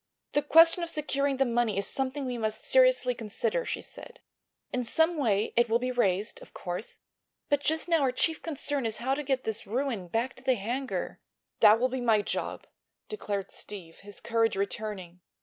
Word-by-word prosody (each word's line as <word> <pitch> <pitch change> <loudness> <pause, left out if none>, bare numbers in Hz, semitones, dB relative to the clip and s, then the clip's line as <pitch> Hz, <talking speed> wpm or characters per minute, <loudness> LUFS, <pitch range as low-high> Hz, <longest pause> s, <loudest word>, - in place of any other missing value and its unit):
"The 290 - +3
question 330 +4 +6
of 340 - -2
securing 280 -3 0
the 270 - +3
money 235 -4 0
is 200 - 0
something 270 +3 -3
we 250 -2 -3
must 220 -1 -3
seriously - - +4
consider," 240 - -2
she - - -3
said. - - -11 0.5
"In 250 0 0
some 320 +8 +2
way 220 -8 0
it 240 0 +3
will 225 - +4
be 250 +1 -2
raised, 205 -3 0
of - - -15
course. 180 +5 -5 0.5
But 290 - +3
just 315 +3 0
now 335 -2 +3
our 265 -2 +2
chief 320 +5 +1
problem 285 -5 -2
is 220 -1 -3
how 250 +4 -1
to 285 - -2
get 265 -2 -1
this 220 -1 -2
ruin 235 -4 -2
back 230 +8 -1
to 250 - -8
the 260 -1 +3
hangar." 245 +6 -3 0.4
"That 215 +2 +7
will 255 +2 +2
be 260 0 -3
my 220 -4 +3
job," - - -4 0.4
declared 205 - -4
Steve, 180 -6 -7
his 205 0 -9
courage 225 -2 +1
returning. 195 -3 -4
245 Hz, 190 wpm, -28 LUFS, 215-280 Hz, 0.5 s, That